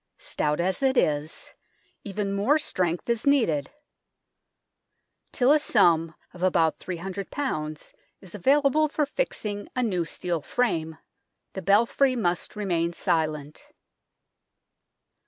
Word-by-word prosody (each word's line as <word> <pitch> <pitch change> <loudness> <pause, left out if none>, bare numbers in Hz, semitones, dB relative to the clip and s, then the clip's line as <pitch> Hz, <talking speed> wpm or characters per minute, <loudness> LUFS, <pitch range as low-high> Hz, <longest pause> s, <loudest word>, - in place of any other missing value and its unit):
Stout 150 +1 -2
as 185 +8 0
it 265 -1 +2
is, 150 +1 -1 0.5
even 200 0 -3
more 210 +10 +3
strength 180 - -1
is 235 +2 -1
needed. 220 - +2 1.6
Till 255 +1 +3
a 305 - +5
sum 165 - +3 0.2
of 175 - -12
about 165 -4 +2
300 190 +2 -5 0.9
is 190 -3 -14
available 280 - +3
for 300 0 0
fixing 215 - -3
a 255 - +1
new 185 -7 0
steel 170 0 -3
frame, 160 -6 -1 0.6
the 190 - -5
belfry 235 +7 +3
must 180 -6 -1
remain 175 -5 -1
silent. 155 -3 -2
190 Hz, 110 wpm, -26 LUFS, 165-245 Hz, 1.6 s, a